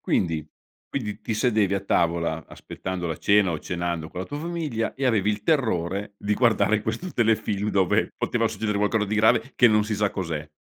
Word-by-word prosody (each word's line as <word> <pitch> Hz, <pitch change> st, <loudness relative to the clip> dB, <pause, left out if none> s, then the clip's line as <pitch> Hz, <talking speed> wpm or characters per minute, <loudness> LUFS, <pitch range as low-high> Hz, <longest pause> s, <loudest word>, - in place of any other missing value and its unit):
Quindi 80 Hz, -4 st, 0 dB, 0.4 s
quindi 105 Hz, -6 st, -4 dB
ti 110 Hz, -, -3 dB
sedevi 105 Hz, -4 st, +2 dB
a 100 Hz, -, 0 dB
tavola 85 Hz, -4 st, 0 dB
aspettando 95 Hz, -2 st, -6 dB
la 80 Hz, -2 st, -3 dB
cena 100 Hz, -2 st, +4 dB
o 80 Hz, -, -2 dB
cenando 85 Hz, -1 st, -3 dB
con 90 Hz, -, -6 dB
la -, -, -5 dB
tua 145 Hz, -, -5 dB
famiglia 155 Hz, -8 st, -3 dB
e 135 Hz, -, -3 dB
avevi 110 Hz, -5 st, +2 dB
il 105 Hz, 0 st, -1 dB
terrore 105 Hz, -, 0 dB
di 105 Hz, +1 st, -2 dB
guardare 110 Hz, -2 st, +3 dB
questo 115 Hz, -, -4 dB
telefilm, 110 Hz, -3 st, +1 dB
dove 95 Hz, -3 st, +2 dB
poteva -, -, 0 dB
succedere 105 Hz, -2 st, -2 dB
qualcosa 105 Hz, +1 st, +1 dB
di 105 Hz, +1 st, -2 dB
grave 110 Hz, +5 st, +3 dB
che 120 Hz, -, +6 dB
non 105 Hz, -1 st, +3 dB
si 110 Hz, -, -2 dB
sa 105 Hz, 0 st, +1 dB
cos'è. 80 Hz, -5 st, -4 dB
105 Hz, 190 wpm, -25 LUFS, 90-110 Hz, 0.4 s, che